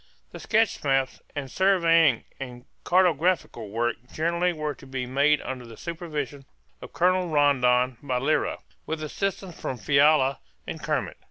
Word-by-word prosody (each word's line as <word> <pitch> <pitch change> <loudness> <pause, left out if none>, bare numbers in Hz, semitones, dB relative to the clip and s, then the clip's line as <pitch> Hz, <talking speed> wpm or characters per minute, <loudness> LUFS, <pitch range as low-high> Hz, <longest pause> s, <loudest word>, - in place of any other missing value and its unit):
The - - -9
sketch 220 -1 +1
maps 135 -2 0
and 135 -3 -5
surveying 165 - +4 0.2
and 125 -2 -8 0.2
cartographical 175 - +1
work 120 +3 -1
generally 170 +3 0
were 150 -3 -3
to 135 - -15
be 130 -1 -3
made 140 +4 +3
under 130 -1 -5
the 115 -1 -12
supervision 150 -5 -5 0.4
of - - -10
Colonel 180 0 +2
Rondon 130 -4 +3
by 130 -3 -1
Lyra, 140 +5 0 0.3
with 160 -1 -3
assistance 190 +2 -4
from 130 - -3
Fiala 140 +2 +3 0.3
and - - -6
Kermit. - - -2
145 Hz, 145 wpm, -26 LUFS, 130-170 Hz, 0.4 s, surveying